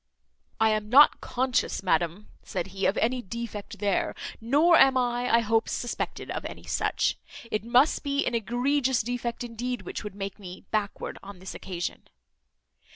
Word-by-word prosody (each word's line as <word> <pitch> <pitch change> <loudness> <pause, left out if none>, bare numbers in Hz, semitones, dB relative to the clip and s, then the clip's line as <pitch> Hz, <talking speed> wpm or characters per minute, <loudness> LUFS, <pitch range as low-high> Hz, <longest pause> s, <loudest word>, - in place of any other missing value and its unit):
"I 220 0 +4
am 215 -1 -1
not 280 +5 +7
conscious, 255 -5 0
madam," 175 +2 0
said 180 -3 -3
he, 195 0 +1
"of 195 - 0
any 250 +2 +1
defect 225 -1 -6
there; 200 -1 0 0.3
nor 295 +9 +5
am 270 -3 +6
I, 245 0 0
I 230 - +6
hope, 225 +1 +1
suspected 240 - -3
of - - -3
any - - -8
such. - - 0 0.3
It 215 - -1
must 245 +6 +4
be 280 0 0
an - - -1
egregious 245 +3 +1
defect 240 0 -3
indeed, 245 +1 -4
which - - -5
could 210 -3 -7
make 200 0 -5
me 185 -2 -10
backward 210 -2 -2
on 200 -1 -10
this 185 +1 -8
occasion." 175 -2 -5
230 Hz, 160 wpm, -27 LUFS, 200-245 Hz, 0.3 s, not